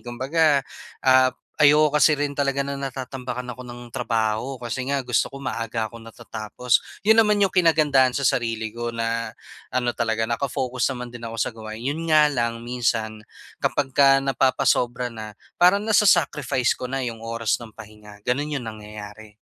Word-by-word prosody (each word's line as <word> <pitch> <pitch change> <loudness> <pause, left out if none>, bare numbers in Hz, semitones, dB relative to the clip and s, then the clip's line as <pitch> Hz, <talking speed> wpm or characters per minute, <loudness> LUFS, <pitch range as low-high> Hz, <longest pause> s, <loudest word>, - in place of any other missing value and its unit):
Kumbaga, 140 +4 +1 0.4
ah, 130 -1 +6 0.3
ayoko 150 0 +5
kasi 155 +1 +5
rin 145 -1 -3
talaga 140 -1 +1
na 140 0 -5
natatambakan 125 -2 -5
ako 125 +1 -9
ng 120 0 -10
trabaho 115 +2 -2
kasi 120 +2 -4
nga 140 0 0
gusto 125 -1 +1
ko 140 0 -10
maaga 115 -3 -3
akong 115 -1 -12
natatapos. 115 +1 -1 0.2
Yun 220 +2 +4
naman 210 -2 +4
yung 195 - +3
kinagandahan 150 -8 +3
sa 140 - -1
sarili 115 -3 0
ko 120 +1 -5
na 115 0 -2 0.4
ano 120 -1 +1
talaga, 115 -2 -1
naka-focus 125 +1 -1
naman 125 -1 -7
din 120 -1 -8
ako 115 - -7
sa 115 - -1
gawain. 110 -1 -9
Yun 150 +6 -3
nga 155 -2 +5
lang 115 -3 -2
minsan, 115 -3 -2 0.3
kapagka 135 0 +3
napapasobra 125 -2 +1
na, 110 -2 -8 0.2
parang 185 +3 +5
nasa-sacrifice 160 - +2
ko 125 - -4
na 135 +1 -3
yung 115 -2 -4
oras 115 -1 -1
ng 115 -2 -12
pahinga. 105 -1 -13
Ganun 145 +6 -1
yung 135 - -3
nangyayari. 105 0 -11
125 Hz, 160 wpm, -23 LUFS, 115-140 Hz, 0.4 s, ah